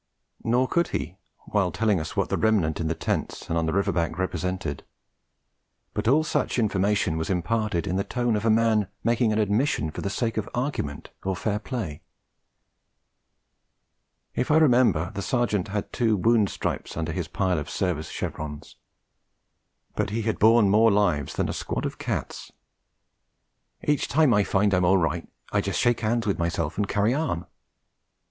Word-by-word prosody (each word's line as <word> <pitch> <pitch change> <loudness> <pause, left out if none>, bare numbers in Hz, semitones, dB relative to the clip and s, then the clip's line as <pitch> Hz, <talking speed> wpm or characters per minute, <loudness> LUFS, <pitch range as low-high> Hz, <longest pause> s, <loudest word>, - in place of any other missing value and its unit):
Nor 125 +3 +2
could 170 +5 +1
he, 85 +7 -4 0.3
while 95 -4 +2
telling 105 0 +1
us 80 0 -6
what - - +1
the - - +1
remnant 100 -9 +2
in 80 - -1
the 80 - -1
tents - - -3
and 85 - -2
on 80 -1 +1
the - - +1
river 100 +2 +1
bank 85 -1 -1
represented; 90 -4 -3 1.1
but - - -2
all 145 +6 +4
such 155 - -1
information 100 -6 +1
was 80 - -3
imparted 100 +1 0
in 90 - -1
the 100 - +1
tone 120 -1 0
of 105 - -1
a 115 - +2
man 110 -2 +3 0.2
making 115 -1 +2
an 105 - 0
admission 105 - +1
for - - -6
the 100 - -2
sake 115 +3 -2
of 110 - -2
argument 120 - -3
or 95 0 -1
fair 105 +3 -1
play. 105 - -5 2.3
If - - -1
I 155 - +5
remember, 125 - +4
the 100 - -4
Sergeant 105 -3 0
had 105 0 -4
two 115 -4 +2
wound 110 0 +3
stripes - - -4
under 80 -1 -2
his 85 -1 -3
pile 90 -1 0
of 75 +3 -6
service 85 -5 -2
chevrons. 75 -1 -6 1.2
But 105 -1 0
he 110 +2 -2
had 110 0 -1
borne 110 0 +6
more 110 +3 +5
lives 90 -9 +1
than - - 0
a - - -3
squad - - -3
of - - -4
cats. - - -4 1.3
'Each 150 -1 +1
time 150 -4 +4
I 105 -2 +3
find 100 +1 +2
I'm 90 -1 +3
all 95 +2 +5
right, 80 -4 -1 0.2
I - - +2
just - - -2
shake 120 -1 +2
'ands 115 +1 +1
with 100 -4 0
myself 85 -2 -1
and 100 - +1
carry 105 +4 +1
on.' 135 - -1
100 Hz, 175 wpm, -25 LUFS, 85-115 Hz, 2.3 s, borne